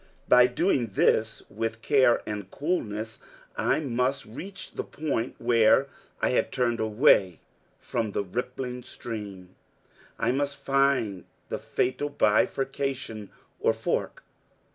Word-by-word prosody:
By 125 0 +7
doing 125 -1 +1
this 110 +2 +1
with 115 +1 -4
care 130 -5 +4
and 105 -3 -5
coolness, 110 - -3 0.4
I - - +1
must 130 0 -1
reach 190 - -8
the - - -4
point 140 -6 -3
where 115 +3 +4 0.3
I - - +4
had 125 - +1
turned 120 -3 0
away 105 - +4 0.4
from 110 -3 -3
the 100 - 0
rippling 125 +5 -4
stream. 100 -7 -8 0.6
I - - +1
must 140 +1 -1
find 135 -8 +1 0.2
the - - -3
fatal 130 +4 -1
bifurcation 130 -2 0 0.3
or - - +3
fork. - - -2
120 Hz, 120 wpm, -27 LUFS, 110-135 Hz, 0.6 s, By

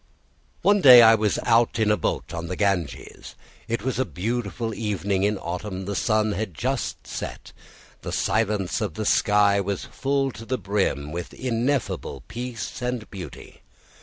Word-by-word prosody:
One 205 0 +4
day 125 -5 +10
I 115 0 +8
was 110 -2 +1
out 115 0 +3
in 110 -2 +2
a - - +4
boat - - -3
on 85 0 -4
the 90 - -3
Ganges. 95 -5 -2 0.3
It 115 -2 -2
was 130 -2 -2
a - - +3
beautiful 115 +1 -3
evening 100 -3 -1
in 105 +1 +1
autumn. 95 +2 -5
The 100 - -3
sun 110 +1 +1
had 100 -3 -4
just 130 - -3
set; - - -7 0.5
the - - -5
silence 105 -4 0
of 100 -7 -3
the 110 - -3
sky 100 -1 +3
was 100 -1 -3
full 135 0 -1
to 110 0 -10
the 130 +3 -2
brim 95 - -1
with 85 +2 -6
ineffable 125 - -2
peace 120 -1 -6
and 125 -3 -3
beauty. 90 -8 -10
105 Hz, 165 wpm, -24 LUFS, 95-120 Hz, 0.5 s, day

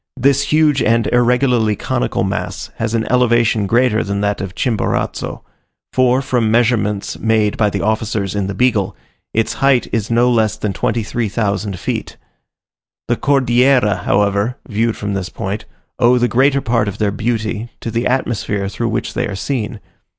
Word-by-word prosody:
This 140 +1 +3
huge 150 -2 +3
and 115 -1 +2
irregularly 120 -2 +2
conical - - -1
mass - - -4
has 115 0 -1
an 115 - 0
elevation 120 -4 +3
greater 120 +1 +2
than 100 -1 -2
that 100 0 -1
of 95 -2 -6
Chimborazo; 115 -6 -2 0.5
for, 130 +1 +3
from 120 -4 +1
measurements 110 -3 +1
made 110 -2 +1
by 105 -2 +2
the - - -3
officers 110 -2 -1
in 100 -2 -1
the 100 - -4
Beagle, 105 -4 +1 0.4
its 115 0 0
height 135 -3 +3
is 115 -1 -1
no 120 +1 +3
less 110 -3 +2
than 105 -2 -2
23,000 105 -3 -1
feet. - - -4 0.9
The - - +3
Cordillera, 130 -4 +3
however, 100 +5 +1
viewed 115 0 0
from 100 -1 -3
this 95 -2 -3
point, 105 0 -5 0.3
owe 125 +1 +5
the 120 0 +2
greater 135 +3 +2
part 115 -3 +1
of 100 - -4
their 105 -2 0
beauty 110 +1 -2
to 115 - -4
the 115 +2 0
atmosphere 110 -6 -1
through 115 +3 -2
which 110 - -2
they - - -1
are 100 - -5
seen. 110 0 -3
115 Hz, 160 wpm, -17 LUFS, 105-125 Hz, 0.9 s, owe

